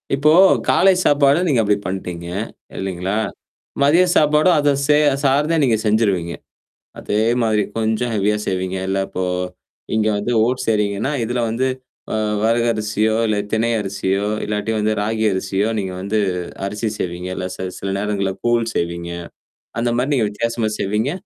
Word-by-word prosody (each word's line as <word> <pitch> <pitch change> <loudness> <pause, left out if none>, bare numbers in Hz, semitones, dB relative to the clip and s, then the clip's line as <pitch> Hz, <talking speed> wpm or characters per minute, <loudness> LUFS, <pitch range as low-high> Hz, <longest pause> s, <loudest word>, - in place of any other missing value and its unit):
இப்போ 150 +2 +3 0.4
காலை 190 +1 +5
சாப்பாடு 145 +1 +4
நீங்க 130 -7 +3
அப்பிடி 105 -1 +2
பண்ட்டீங்க. 90 -2 -5 0.5
இல்லேங்களா! 95 +1 -2 0.7
மதிய 165 +6 +5
சாப்பாடும், 150 +4 +4
அத 145 0 +3 0.2
சே 150 0 +5 0.3
சார்ந்தே 145 +4 +2
நீங்க 120 -5 +3
செஞ்சுருவீங்க. 100 -6 +1 0.7
அதே 105 - -1 0.2
மாதிரி. 110 -2 +2
கொஞ்சம் 110 +2 0
ஹெவியா 105 +1 +1
செய்வீங்க. 95 0 -2
இல்ல 95 +1 0
இப்போ 95 - -4 0.7
இங்க 110 0 +2
வந்து 105 +4 -2
ஓட்ஸ் 125 +1 -2
செய்றீங்கன்னா, 105 +3 0
இதுல 120 +2 -2
வந்து 120 +4 0 0.5
அ - - 0 0.3
வரகரிசியோ! 110 -2 +1
இல்ல 105 -1 +1 0.2
தினை 115 +1 +2
அரிசியோ! 100 0 -1 0.2
இல்லாட்டி 105 +1 -2
வந்து 105 +1 +1
ராகி 110 +1 -1
அரிசியோ! 95 +3 -1
நீங்க 95 -2 -4
வந்து 100 +3 -1 0.5
அரிசி 105 +3 -2
செய்வீங்க. 90 +1 -4
இல்ல 90 - -3
ச - - -16 0.2
சில 95 - -4
நேரங்கள்ல 100 -2 -1
கூழ் 120 -1 +2
செய்வீங்க. 85 0 -2 0.7
அந்தமாரி 120 +4 0
நீங்க 115 -5 +2
வித்தியாசமா 115 +1 -1
செய்வீங்க? 105 +7 0
110 Hz, 140 wpm, -20 LUFS, 100-120 Hz, 0.7 s, காலை